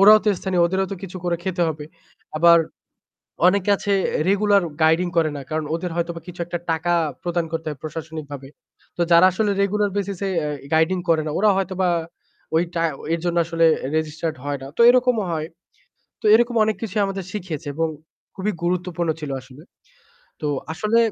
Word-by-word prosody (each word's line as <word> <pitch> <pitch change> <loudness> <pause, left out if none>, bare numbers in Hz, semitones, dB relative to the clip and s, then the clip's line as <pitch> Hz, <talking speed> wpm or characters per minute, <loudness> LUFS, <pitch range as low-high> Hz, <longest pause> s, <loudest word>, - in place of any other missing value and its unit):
ওরাও 210 +2 +9
তো 215 - +2
স্থানীয়, 185 -2 +1
ওদেরও 190 +2 0
তো - - -1
কিছু 185 -1 -7
করে 175 -1 +1
খেতে 180 -2 -1
হবে। 155 -1 -5 0.5
আবার 170 +1 +7 0.9
অনেকে 200 +1 +2
আছে 205 - -3 0.4
রেগুলার 200 0 +3
এ - - -14
গাইডিং 165 +3 +3
করে 160 -1 +3
না। - - -6
কারণ 155 0 -2
ওদের 175 +1 -4
হয়তো 170 0 -1
বা 165 - -7
কিছু 175 -1 -10
একটা 175 0 -3
টাকা 165 +2 0 0.3
প্রদান 175 -1 -1
করতে 165 -1 -4
হয় 150 -3 -7
প্রশাসনিকভাবে। 155 -3 -7 0.5
তো - - -1
যারা 170 +2 +8
আসলে 205 +3 0
রেগুলার 205 +1 +1
বেসিসে 200 -1 -2
অ্যা 150 - -2 0.2
গাইডিং 160 +4 +3
করে 160 -1 +4
না - - -2
ওরা 210 +2 +4
হয়তোবা 190 -1 0 0.7
ওই 165 - +4
টা 165 - 0 0.3
এর 165 - 0
জন্য 175 0 0
আসলে 165 0 +2 0.3
registered 160 0 -2
হয় 145 0 -2
না 135 - -7
তো - - +3
এরকমও 250 -3 +3
হয়। 155 -1 -2 0.7
তো - - -25
এইরকম 240 +2 +3
অনেক 215 0 0
কিছুই 215 -1 -1
আমাদের 195 -1 -4
শিখিয়েছে 170 -6 -5
এবং 165 +2 0 0.5
খুবই 205 +2 -2
গুরুত্বপূর্ণ 175 -1 -1
ছিল 150 -2 -5
আসলে। 130 +3 -15 0.8
তো 150 - -2 0.3
আসলে 215 +7 +1
175 Hz, 180 wpm, -22 LUFS, 160-195 Hz, 0.9 s, ওরাও